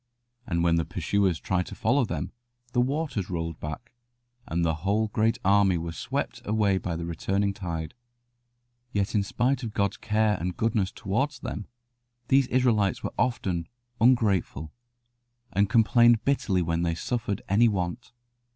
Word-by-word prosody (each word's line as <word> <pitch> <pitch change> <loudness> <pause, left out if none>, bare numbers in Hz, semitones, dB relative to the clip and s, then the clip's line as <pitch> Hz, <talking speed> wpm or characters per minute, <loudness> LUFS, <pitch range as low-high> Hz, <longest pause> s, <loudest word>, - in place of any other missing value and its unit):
And 85 -4 0
when 85 -1 +3
the 85 - +1
pursuers 95 -4 0
tried 90 -1 -1
to - - -8
follow 125 +3 +2
them, 85 -1 -4 0.4
the 120 - +3
waters 135 - -1
rolled 85 -3 -3
back, 80 +11 -7 0.6
and 85 +1 0
the 80 - +2
whole 105 +4 +1
great 110 +2 +1
army 100 -2 +4
were 85 0 -4
swept - - -4
away 100 -2 +1
by 85 -3 -3
the 85 0 -4
returning 100 +4 -1
tide. 85 -4 -5 1.0
Yet 100 -1 0
in 105 - +3
spite 125 +7 0
of 110 -4 -6
God's 100 -1 0
care 105 -2 +1
and 90 +1 -3
goodness 110 -4 +1
towards 130 +8 -2
them, 105 - -5 0.6
these 135 -1 +4
Israelites 115 -7 +2
were - - -3
often 90 -9 -1 0.3
ungrateful, 105 - +2 0.8
and 100 0 +2
complained 120 0 +4
bitterly 100 -10 +1
when 85 0 -1
they 85 -1 0
suffered 110 +1 -3
any 110 +5 +4
want. 100 +2 -2
100 Hz, 150 wpm, -27 LUFS, 85-115 Hz, 1.0 s, army